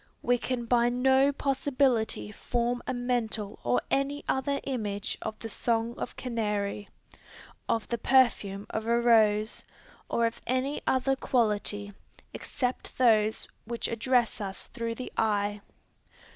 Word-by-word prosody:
We 245 Hz, 0 st, +3 dB
can 245 Hz, -1 st, -2 dB
by 240 Hz, 0 st, +3 dB
no 265 Hz, +3 st, +4 dB
possibility 265 Hz, -6 st, 0 dB
form 240 Hz, +3 st, -1 dB
a -, -, 0 dB
mental 235 Hz, -4 st, -2 dB
or 120 Hz, 0 st, +1 dB
any 280 Hz, +1 st, 0 dB
other 280 Hz, +1 st, 0 dB
image 210 Hz, -6 st, -2 dB
of 220 Hz, 0 st, -4 dB
the 225 Hz, -, -6 dB
song 230 Hz, +1 st, 0 dB
of -, -, -5 dB
canary, 210 Hz, -4 st, -2 dB, 0.8 s
of 225 Hz, -, 0 dB
the 235 Hz, -, -2 dB
perfume 215 Hz, -6 st, +3 dB
of 220 Hz, 0 st, -3 dB
a 235 Hz, 0 st, +3 dB
rose, 220 Hz, -2 st, +3 dB, 0.5 s
or 235 Hz, -, +2 dB
of 230 Hz, -, -3 dB
any 260 Hz, +3 st, 0 dB
other 265 Hz, +1 st, +2 dB
quality, 210 Hz, -5 st, 0 dB, 0.4 s
except 250 Hz, -1 st, -3 dB
those 220 Hz, -3 st, +3 dB, 0.2 s
which 235 Hz, +1 st, -2 dB
address 235 Hz, 0 st, +1 dB
us 195 Hz, -1 st, -5 dB
through 230 Hz, -1 st, -4 dB
the 255 Hz, -, -7 dB
eye. 205 Hz, -1 st, +1 dB
235 Hz, 130 wpm, -29 LUFS, 215-255 Hz, 0.8 s, no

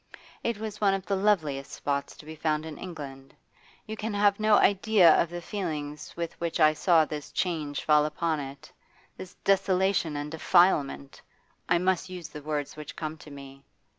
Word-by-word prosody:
It 235 Hz, -2 st, -1 dB
was 215 Hz, 0 st, -6 dB
one 195 Hz, -2 st, +4 dB
of 195 Hz, -1 st, -6 dB
the 200 Hz, -, 0 dB
loveliest 160 Hz, -9 st, 0 dB
spots 140 Hz, -1 st, -3 dB
to -, -, -13 dB
be 160 Hz, +1 st, -8 dB
found 155 Hz, 0 st, -1 dB
in 155 Hz, -2 st, -8 dB
England. 140 Hz, -6 st, -9 dB, 0.5 s
You 220 Hz, -, -5 dB
can 220 Hz, 0 st, -4 dB
have 205 Hz, 0 st, +3 dB
no 215 Hz, 0 st, +4 dB
idea 200 Hz, -4 st, +5 dB
of 170 Hz, -, -1 dB
the 175 Hz, 0 st, -7 dB
feelings 155 Hz, -7 st, -5 dB
with 170 Hz, -1 st, -3 dB
which 170 Hz, -1 st, -2 dB
I 155 Hz, -1 st, +6 dB
saw 160 Hz, 0 st, +4 dB
this 150 Hz, -1 st, -7 dB
change 155 Hz, -5 st, -2 dB
fall 150 Hz, -1 st, +4 dB
upon 155 Hz, +1 st, -1 dB
it, 140 Hz, -1 st, -9 dB, 0.4 s
this 185 Hz, -, -10 dB
desolation 190 Hz, -4 st, +2 dB
and 145 Hz, +1 st, -5 dB
defilement 155 Hz, -4 st, +2 dB, 0.5 s
I 170 Hz, -, +4 dB
must 185 Hz, +1 st, 0 dB
use 180 Hz, -3 st, -7 dB
the 150 Hz, -, -9 dB
words 145 Hz, -1 st, -3 dB
which 150 Hz, 0 st, -9 dB
come 155 Hz, -1 st, -4 dB
to 150 Hz, -, -13 dB
me. 140 Hz, -1 st, -11 dB
160 Hz, 180 wpm, -27 LUFS, 150-190 Hz, 0.5 s, I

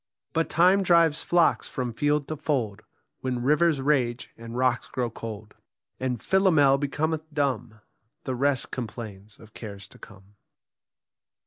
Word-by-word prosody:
But 165 Hz, 0 st, 0 dB
Time 180 Hz, +4 st, +4 dB
drives 170 Hz, -4 st, +4 dB
flocks 175 Hz, -1 st, +2 dB
from 125 Hz, -2 st, -4 dB
field 145 Hz, +3 st, +1 dB
to 155 Hz, -, -2 dB
fold, 130 Hz, -9 st, -2 dB, 0.4 s
When 125 Hz, -2 st, -2 dB
rivers 150 Hz, +1 st, +3 dB
rage 130 Hz, -4 st, 0 dB
and 115 Hz, +1 st, -8 dB
rocks 125 Hz, -1 st, +1 dB
grow 125 Hz, -3 st, -2 dB
cold; 110 Hz, -2 st, -8 dB, 0.5 s
And 125 Hz, -2 st, -2 dB
Philomel 160 Hz, -8 st, +4 dB
becometh 155 Hz, +3 st, -2 dB
dumb; 125 Hz, -7 st, -2 dB, 0.4 s
The 130 Hz, -, -3 dB
rest 135 Hz, +1 st, 0 dB
complains 105 Hz, -4 st, -7 dB
of 110 Hz, 0 st, -16 dB
cares 100 Hz, -3 st, -8 dB
to -, -, -16 dB
come. 95 Hz, +2 st, -15 dB
130 Hz, 135 wpm, -26 LUFS, 115-150 Hz, 0.5 s, Time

